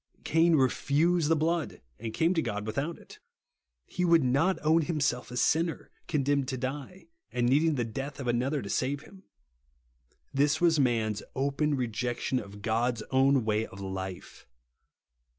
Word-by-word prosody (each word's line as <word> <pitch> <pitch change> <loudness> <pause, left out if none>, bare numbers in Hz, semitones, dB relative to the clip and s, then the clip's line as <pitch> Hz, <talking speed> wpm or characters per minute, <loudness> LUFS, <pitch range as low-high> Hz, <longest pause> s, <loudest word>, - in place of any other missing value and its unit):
Cain 165 +1 +3
refused 150 +5 +2
the 165 - +4
blood, 160 +1 -1 0.2
and 115 0 -4
came 165 +9 +2
to 165 - +1
God 105 -7 -3
v/ithout 140 +9 -3
it. - - -15 0.7
He 180 - -3
would 170 -3 +5
not 145 +9 +2
own 160 +2 +4
himself 145 -6 -1
a 125 - -6
sinner, 165 +5 0 0.2
condemned 140 -2 +1
to 130 -1 -3
die, 140 - -6 0.2
and 120 -1 0
needing 150 +5 +3
the 120 -3 -1
death 135 +6 -6
of 130 - -5
another 130 +4 0
to 100 - -7
save 140 +2 -1
him. 190 -1 -16 1.1
This 145 +3 +2
was 165 -3 +3
man's 110 -5 +1
open 140 +2 0
rejection 125 +1 -1
of 100 -2 -10
God's 115 +1 0
own 135 -2 +3
way 110 0 0
of 95 - -12
life. 95 -1 -7
135 Hz, 155 wpm, -29 LUFS, 120-160 Hz, 1.1 s, would